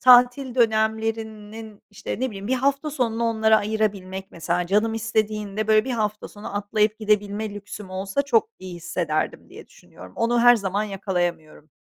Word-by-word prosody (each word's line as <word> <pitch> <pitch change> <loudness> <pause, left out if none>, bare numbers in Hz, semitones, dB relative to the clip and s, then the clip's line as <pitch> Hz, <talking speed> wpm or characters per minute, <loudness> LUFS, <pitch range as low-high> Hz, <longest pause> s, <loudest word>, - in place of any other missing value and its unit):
tatil 250 +1 +6
dönemlerinin, 220 -2 -1
işte, 205 +3 -6
ne 260 - +1
bileyim, 200 -1 -7
bir 255 - +1
hafta 275 +3 0
sonunu 235 -5 -1
onlara 220 -1 +4
ayırabilmek, 200 -3 -2
mesela 175 +1 -1
canım 210 +4 +2
istediğinde, 215 -1 -1
böyle, 215 0 +5
bir 265 - -4
hafta 215 -3 -2
sonu 205 0 -7
atlayıp 210 +1 +1
gidebilme 210 0 0
lüksüm 205 -1 -8
olsa 195 +7 -1
çok 435 +10 +2
iyi 185 -1 -8
hissederdim 165 -2 -2
diye - - -12
düşünüyorum. 90 +1 -15
Onu 235 +1 +2
her 245 0 +7
zaman 200 -1 -1
yakalayamıyorum. 175 -6 -3
215 Hz, 150 wpm, -24 LUFS, 195-225 Hz, -, her